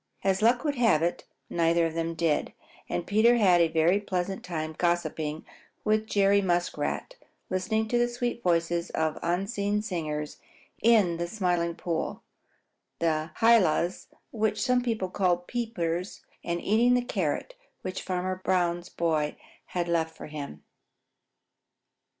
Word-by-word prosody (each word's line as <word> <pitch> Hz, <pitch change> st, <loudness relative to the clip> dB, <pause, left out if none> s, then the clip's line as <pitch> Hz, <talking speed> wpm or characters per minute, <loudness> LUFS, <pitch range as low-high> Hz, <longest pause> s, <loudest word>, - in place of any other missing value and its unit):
As 195 Hz, 0 st, +1 dB
luck 240 Hz, +4 st, +4 dB
would 290 Hz, -3 st, -1 dB
have 225 Hz, -10 st, +4 dB
it, 175 Hz, -, -1 dB, 0.2 s
neither 170 Hz, 0 st, +2 dB
of 165 Hz, -, -2 dB
them 165 Hz, 0 st, -2 dB
did, 160 Hz, -2 st, 0 dB, 0.4 s
and 175 Hz, -, -2 dB
Peter 220 Hz, +4 st, +4 dB
had 185 Hz, -6 st, +5 dB
a 165 Hz, -, +5 dB
very 165 Hz, +4 st, +3 dB
pleasant 190 Hz, -1 st, -3 dB
time 160 Hz, -3 st, -4 dB
gossiping 160 Hz, -3 st, -1 dB, 0.4 s
with 215 Hz, 0 st, +1 dB
Jerry 200 Hz, -1 st, +3 dB
Muskrat, 175 Hz, -, -1 dB, 0.3 s
listening 220 Hz, +4 st, 0 dB
to 240 Hz, -, +2 dB
the 240 Hz, -, +3 dB
sweet 240 Hz, 0 st, -3 dB
voices 170 Hz, -1 st, +1 dB
of 160 Hz, -1 st, -1 dB
unseen 200 Hz, +4 st, -1 dB
singers 155 Hz, -7 st, -3 dB, 0.4 s
in 210 Hz, -7 st, +4 dB
the 170 Hz, 0 st, -2 dB
Smiling 175 Hz, -4 st, 0 dB
Pool, 165 Hz, -2 st, -3 dB, 0.7 s
the 160 Hz, -1 st, 0 dB
Hylas, 190 Hz, -6 st, +3 dB, 0.2 s
which 215 Hz, -1 st, 0 dB
some 250 Hz, -1 st, +3 dB
people 220 Hz, -7 st, -2 dB
call 180 Hz, -3 st, +2 dB
peepers, 180 Hz, -3 st, -3 dB, 0.2 s
and 170 Hz, 0 st, -2 dB
eating 235 Hz, +4 st, +4 dB
the 245 Hz, 0 st, 0 dB
carrot 190 Hz, -, -2 dB, 0.3 s
which 185 Hz, 0 st, -4 dB
Farmer 185 Hz, 0 st, -2 dB
Brown's 175 Hz, -1 st, 0 dB
boy 155 Hz, -3 st, 0 dB, 0.3 s
had 175 Hz, -1 st, -2 dB
left 160 Hz, -1 st, 0 dB
for -, -, -8 dB
him. 145 Hz, -, -7 dB
180 Hz, 140 wpm, -28 LUFS, 165-215 Hz, 0.7 s, had